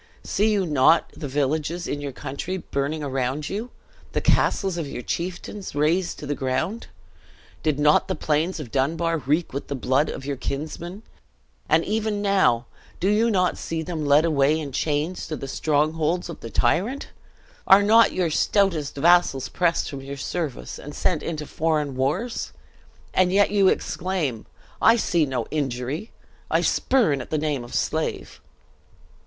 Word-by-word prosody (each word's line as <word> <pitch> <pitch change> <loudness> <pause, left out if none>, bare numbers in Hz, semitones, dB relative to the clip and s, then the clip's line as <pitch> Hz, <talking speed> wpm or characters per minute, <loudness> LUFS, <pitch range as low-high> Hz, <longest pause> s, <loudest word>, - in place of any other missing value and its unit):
See 215 +2 +1
you 200 -3 +1
not 150 +1 +4
the 150 - -5
villages 150 +5 -1
of 145 - -3
your 140 -1 -4
country 145 +8 -5
burning 150 -2 -3
around 135 +1 -2
you? 215 +5 -4 0.4
the - - +1
castles 190 -3 +2
of 165 -4 -3
your 125 - -6
chieftains 180 - -5
razed 165 +5 +1
to - - -7
the 145 - -1
ground? 155 - -2 0.7
Did 155 -3 0
not 150 +1 +4
the - - -1
plains 160 +4 0
of 130 -7 -7
Dunbar 165 +5 0
reek 150 +4 0
with 140 - -4
the 140 - -3
blood 130 +3 +1
of 135 - -6
your 140 -1 -3
kinsmen; 160 - -5 0.7
and - - +4
even 215 -1 -1
now, 190 - +2 0.3
do 190 - +1
you 220 +3 +3
not 185 -4 +1
see 165 -1 -3
them 160 -2 -4
led 145 +2 +4
away 150 -1 +3
in 145 -3 -5
chains 150 +6 -1
to 155 - -3
the 135 - -6
strongholds 155 +5 0
of 170 - -7
the 115 - -8
tyrant? 180 - 0 0.6
Are 195 +1 +8
not 225 +3 +6
your 175 -3 0
stoutest 170 -5 +1
vassals 165 -3 +3
pressed 170 -2 +1
from 140 -1 -6
your 140 +1 -7
service, 150 0 -4
and 145 +1 -9
sent 170 -5 0
into 155 -2 -4
foreign 150 -3 -1
wars? 150 - -2 0.6
And 185 -1 +3
yet 200 +1 +4
you 200 -2 +4
exclaim, 165 - -1 0.3
'I 225 - +7
see 175 -8 +2
no 130 -2 -2
injury 140 - -3 0.4
I - - +2
spurn 205 - +2
at - - -9
the 155 - 0
name 150 -4 -1
of 120 - -8
slave!'" - - -2
155 Hz, 165 wpm, -24 LUFS, 140-185 Hz, 0.7 s, Are